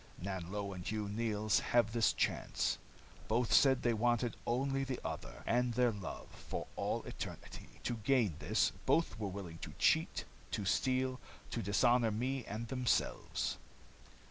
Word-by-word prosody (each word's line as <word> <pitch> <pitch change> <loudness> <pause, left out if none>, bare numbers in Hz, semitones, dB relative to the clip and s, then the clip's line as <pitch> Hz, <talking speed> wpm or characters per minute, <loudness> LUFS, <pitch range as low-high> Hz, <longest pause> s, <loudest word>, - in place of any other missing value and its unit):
Nanlo 100 +2 -3
and 90 -1 -7
Hugh 105 +2 -2
Neils 105 0 +1
have 120 -3 +2
this 115 -2 +4
chance. - - 0 0.5
Both 115 +2 +2
said 130 -2 +6
they 120 - +3
wanted 120 +1 +1
only 135 +3 +1
the 130 -2 -3
other, - - -5
and 120 0 +2
their 125 -1 +4
love, 100 -3 -6
for - - -5
all - - -1
eternity. - - -8
To 120 - -1
gain 110 -3 +2
this, - - +2 0.2
both 165 -8 +2
were 105 - -1
willing 90 -4 -6
to - - -7
cheat, - - +2 0.2
to 100 - -2
steal, 130 +5 +1 0.3
to 115 - -1
dishonor 115 +4 +4
me 125 +5 -1
and 110 +3 -4
themselves. 125 0 0
115 Hz, 145 wpm, -35 LUFS, 105-125 Hz, 0.5 s, said